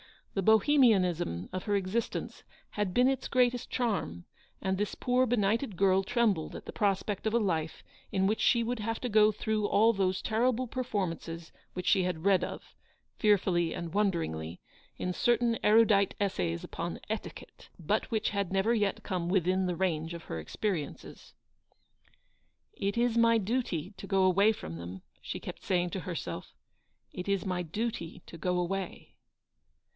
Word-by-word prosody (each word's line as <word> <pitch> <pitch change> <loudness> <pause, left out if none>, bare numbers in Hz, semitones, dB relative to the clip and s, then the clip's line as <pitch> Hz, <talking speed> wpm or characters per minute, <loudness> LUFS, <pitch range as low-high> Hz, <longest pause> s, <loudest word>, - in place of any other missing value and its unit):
The 195 - 0
Bohe 220 +9 +4
mianism 180 - +3
of 185 - -4
her 205 - +1
existence 200 +4 -2 0.3
had 205 -3 -1
been 250 +4 +4
its 265 -1 0
greatest 245 -1 +1
charm; 195 - -2 0.4
and 190 0 0
this 205 +1 -2
poor 255 +1 +2
benighted 225 0 +1
girl 190 +1 +3
trembled 215 -7 0
at - - -8
the - - -6
prospect 200 0 0
of 220 - 0
a - - +4
life 165 -7 -1 0.3
in 190 -2 +1
which 215 +3 +1
she 235 -2 +3
would 240 +1 -2
have 225 +1 -2
to 250 - -2
go 215 0 +5
through 215 0 -1
all 225 +3 +4
those 190 -2 0
terrible 245 +3 +1
performances 175 -9 -3 0.2
which 180 -1 -5
she 195 - +4
had 180 -3 -2
read 195 -2 +4
of, - - -7 0.5
fearfully 185 -5 +2
and 170 -1 -5
wonderingly, 160 - -1 0.4
in 180 - -2
certain 235 +2 +2
erudite 210 -2 +4
essays 90 - -1
upon - - -5
Etiquette, - - -7
but 200 +6 -1
which 220 -1 0
had 200 -3 -2
never 195 +4 +2
yet 205 -4 0
come 175 -2 -2
within 185 0 +2
the 180 - -1
range 165 -2 -1
of 170 - -9
her 80 - -5
experiences. 160 - -4 0.7
" - - -39
It 200 - -1
is 235 -1 +2
my 230 0 +5
duty 205 -5 -2
to 195 - -8
go 195 -1 +2
away 195 +3 +5
from 80 - -7
them," 90 +2 -8 0.2
she - - -6
kept - - -8
saying 175 -1 0
to 190 - -3
herself; 175 -2 -5 0.3
" - - -46
it 180 0 -6
is 200 -2 0
my 180 -2 -1
duty 180 -1 -4
to 170 - -10
go 180 +2 0
away." 185 +1 -3
195 Hz, 170 wpm, -30 LUFS, 175-220 Hz, 0.7 s, go